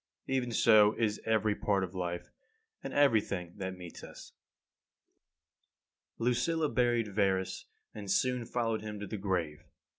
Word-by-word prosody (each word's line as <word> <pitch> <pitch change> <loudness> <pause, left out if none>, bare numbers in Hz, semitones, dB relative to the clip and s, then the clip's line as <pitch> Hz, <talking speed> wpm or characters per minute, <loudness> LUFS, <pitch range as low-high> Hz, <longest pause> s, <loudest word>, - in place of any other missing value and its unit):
Even 130 -2 -1
so 110 -2 +5
is 105 -2 -1
every 110 -1 +2
part 100 -2 +1
of 90 0 -5
life, 90 -2 -4 0.5
and - - -5
everything 105 -10 +2
that 95 -1 -4
meets 90 -2 -10
us. - - -11 1.8
25. 115 - -3
Lucilla 155 +5 +1
buried 120 -4 +1
Verus, 95 -2 0 0.3
and 105 -2 -8
soon 125 +5 +1
followed 115 -2 -1
him 105 -1 -6
to 105 - -5
the 110 - -5
grave. 90 -6 -2
105 Hz, 140 wpm, -31 LUFS, 95-120 Hz, 1.8 s, so